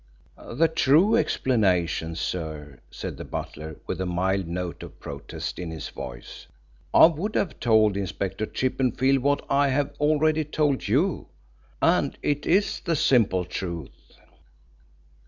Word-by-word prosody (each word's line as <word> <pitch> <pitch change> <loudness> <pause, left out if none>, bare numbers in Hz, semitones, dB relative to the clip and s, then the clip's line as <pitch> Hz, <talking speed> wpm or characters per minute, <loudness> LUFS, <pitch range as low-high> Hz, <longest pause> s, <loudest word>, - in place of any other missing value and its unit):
"The 155 +8 +3
true 160 +5 +4
explanation, 90 - +1
sir," 80 -5 -5
said - - -6
the - - -6
butler, 80 +1 -6
with - - -4
a - - -1
mild 95 +1 0
note 85 -1 -4
of - - -11
protest 70 0 -6
in 90 -2 -4
his 80 -2 -6
voice. - - -9 0.4
"I - - +8
would 170 +6 0
have 180 - -1
told 110 -3 +4
Inspector 100 +1 -3
Chippenfield 130 +1 +1
what 140 +2 0
I 140 +1 +3
have 140 +1 0
already 155 +1 +2
told 150 -4 0
you. 145 - +1 0.6
And - - +2
it 145 0 -1
is 195 +4 +2
the 170 -2 -1
simple 110 -10 +3
truth." 85 -4 -7
115 Hz, 135 wpm, -25 LUFS, 90-145 Hz, 0.6 s, I